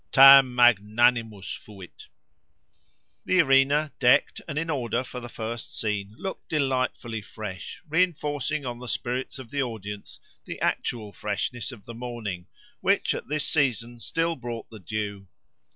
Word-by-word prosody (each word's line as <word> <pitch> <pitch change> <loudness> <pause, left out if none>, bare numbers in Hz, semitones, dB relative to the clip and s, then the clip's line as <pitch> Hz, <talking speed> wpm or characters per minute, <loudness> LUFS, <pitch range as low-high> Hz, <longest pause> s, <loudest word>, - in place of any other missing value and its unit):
—Tam 135 -1 +9
magnanimus 115 -2 +3
fuit! 95 -4 -13 1.2
The 185 - +3
arena, 140 0 +4
decked 125 -1 +4
and 150 -2 -4
in 165 +2 -1
order 125 -3 -1
for 125 - -7
the 120 -1 -8
first 115 0 -5
scene, 105 -1 -2
looked 190 - -6
delightfully 130 -6 -1
fresh, 105 - -8
re 160 +4 +3
inforcing 150 -4 -1
on 120 -1 -4
the 125 - -8
spirits 125 +3 -3
of 130 -3 -10
the 140 -1 0
audience 105 -5 -6 0.2
the - - -7
actual 110 -4 -2
freshness 105 +5 -3
of 110 -5 -12
the 115 - -8
morning, 115 -7 -5 0.3
which 195 +2 +2
at - - -6
this 150 0 -1
season 120 -5 0
still 165 +7 -1
brought 120 -4 -6
the 110 - -10
dew. 100 +1 -4
120 Hz, 145 wpm, -26 LUFS, 110-140 Hz, 1.2 s, Tam